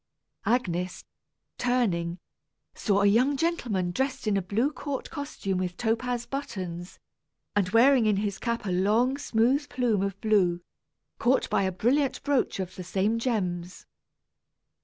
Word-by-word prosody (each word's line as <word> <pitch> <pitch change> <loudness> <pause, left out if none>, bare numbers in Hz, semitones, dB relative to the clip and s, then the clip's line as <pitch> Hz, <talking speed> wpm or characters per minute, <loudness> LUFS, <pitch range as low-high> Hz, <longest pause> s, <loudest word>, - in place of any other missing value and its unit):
Agnes, 180 -7 -1 0.5
turning, 190 -9 0 0.6
saw 200 -2 +1
a - - +4
young 250 +8 +4
gentleman 240 - 0
dressed 265 +5 -2
in 210 -2 +2
a 195 - +2
blue 220 +10 0
court 285 -2 -5
costume 280 - -3
with 180 -1 -3
topaz 240 +1 -1
buttons, 185 -10 -5 0.6
and 195 -3 +2
wearing 235 +2 +5
in 210 - +3
his 200 -1 -2
cap 235 -2 -2
a 190 - -1
long 215 +8 +2
smooth 275 +2 +1
plume 245 -5 +1
of 195 0 -2
blue, 190 -6 +2 0.6
caught 255 +2 +2
by - - +3
a 190 -1 +1
brilliant 260 +9 +1
brooch 285 -8 +1
of 185 -1 -4
the 185 - -5
same 195 +5 0
gems. 180 -7 -2
215 Hz, 140 wpm, -27 LUFS, 185-250 Hz, 0.6 s, wearing